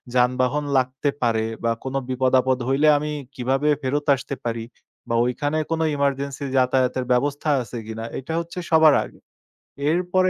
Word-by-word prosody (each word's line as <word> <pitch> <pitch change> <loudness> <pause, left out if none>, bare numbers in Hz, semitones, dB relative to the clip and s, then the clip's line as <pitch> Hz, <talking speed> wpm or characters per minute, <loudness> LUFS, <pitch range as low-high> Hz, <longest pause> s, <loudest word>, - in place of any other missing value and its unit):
যানবাহন 125 +3 +2
লাগতে 130 +3 0
পারে 110 -2 +1 0.2
বা 115 - +2
কোনো 135 +1 -2
বিপদ-আপদ 130 0 +2
হইলে 140 +3 +3
আমি 150 +1 -3 0.2
কিভাবে 135 +4 0
ফেরত 145 +3 -1
আসতে 135 +1 -6
পারি 115 -1 -2 0.4
বা 115 - -2
ঐখানে 145 +5 -1
কোনো 160 0 +1
এমার্জেন্সি 140 0 -1
যাতায়াতের 130 0 +2
ব্যবস্থা 145 +4 +1
আছে 120 0 -7
কিনা, 115 0 -5
এইটা 135 +5 -5
হচ্ছে 170 +2 -6
সবার 160 -2 +7
আগে। - - -13 0.7
এরপরে 180 +2 +2
135 Hz, 145 wpm, -23 LUFS, 125-145 Hz, 0.7 s, সবার